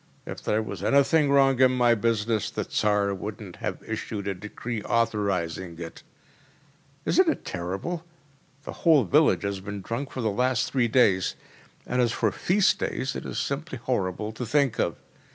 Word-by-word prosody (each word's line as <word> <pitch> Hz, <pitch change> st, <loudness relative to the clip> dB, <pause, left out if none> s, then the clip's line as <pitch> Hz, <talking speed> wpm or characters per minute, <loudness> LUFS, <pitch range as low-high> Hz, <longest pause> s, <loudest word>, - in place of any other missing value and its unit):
If -, -, -7 dB
there 110 Hz, +1 st, 0 dB
was 100 Hz, -3 st, -6 dB
anything 140 Hz, +4 st, +4 dB
wrong 135 Hz, -2 st, +4 dB
in 130 Hz, -1 st, +6 dB
my 120 Hz, -2 st, +4 dB
business, 110 Hz, -1 st, 0 dB
the -, -, -3 dB
Tsar 105 Hz, -1 st, +1 dB
wouldn’t 100 Hz, -1 st, -7 dB
have -, -, -4 dB
issued 110 Hz, -2 st, -4 dB
a 100 Hz, -, 0 dB
decree 105 Hz, +4 st, -6 dB
authorising 95 Hz, -7 st, -1 dB
it.’ 85 Hz, -1 st, -8 dB, 1.0 s
Isn’t 370 Hz, 0 st, +4 dB
it -, -, -2 dB
terrible? 95 Hz, -, -4 dB, 0.6 s
The -, -, -7 dB
whole 155 Hz, -5 st, +5 dB
village 90 Hz, -, +3 dB
has 100 Hz, -1 st, -2 dB
been 100 Hz, +1 st, -6 dB
drunk 115 Hz, +8 st, -4 dB
for 130 Hz, -, -5 dB
the 110 Hz, -2 st, +1 dB
last 125 Hz, +3 st, +1 dB
three 125 Hz, -3 st, +2 dB
days. 105 Hz, -6 st, +3 dB, 0.5 s
And 125 Hz, 0 st, 0 dB
as 120 Hz, -1 st, +2 dB
for 110 Hz, -3 st, +1 dB
feast 185 Hz, -, +2 dB
days, 130 Hz, -, -2 dB
it -, -, -5 dB
is -, -, -5 dB
simply 140 Hz, 0 st, -3 dB
horrible 105 Hz, -4 st, -2 dB
to 110 Hz, +3 st, -6 dB
think 135 Hz, +1 st, +1 dB
of! -, -, +1 dB
115 Hz, 170 wpm, -26 LUFS, 100-130 Hz, 1.0 s, in